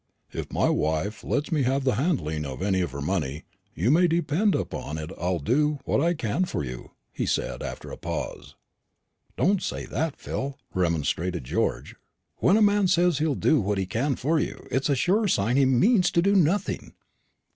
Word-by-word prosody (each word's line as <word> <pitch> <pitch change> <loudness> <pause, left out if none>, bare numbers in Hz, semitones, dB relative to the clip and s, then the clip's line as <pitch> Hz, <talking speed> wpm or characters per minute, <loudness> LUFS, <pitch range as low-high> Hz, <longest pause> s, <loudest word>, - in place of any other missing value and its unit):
"If - - -6
my - - +2
wife 80 +8 -1
lets 145 +3 -1
me 155 -3 +2
have 135 +2 +1
the 130 - +2
handling 105 - -1
of 70 +4 -5
any 95 -2 +1
of 90 - -1
her 70 +1 -6
money, 75 -4 -2 0.3
you 105 +10 +2
may 175 +4 +5
depend 170 +4 +1
upon 75 - -4
it 80 +2 -6
I'll 90 +1 -1
do 145 - +1
what - - +1
I 170 +2 +2
can 145 - 0
for 125 - -3
you," 60 -2 -7 0.2
he - - -2
said, - - -1
after - - -6
a - - -7
pause. - - -5 0.8
"Don't 195 +1 +2
say - - -4
that, 160 -2 -2
Phil," 135 +1 -4 0.2
remonstrated 85 -1 0
George. - - -2 0.4
"When 195 - +4
a 220 - +5
man 205 -1 +4
says 175 -4 +3
he'll 155 -2 +1
do 155 -5 +3
what 100 0 -1
he 95 - 0
can 125 +8 -1
for 155 +6 +1
you, - - -4
it's 135 +3 0
a 140 - +3
sure 205 - +2
sign 115 - +1
he 135 0 +5
means 180 - +4
to 170 - +3
do 200 +1 +3
nothing. 185 +2 +1
135 Hz, 190 wpm, -26 LUFS, -, 0.8 s, may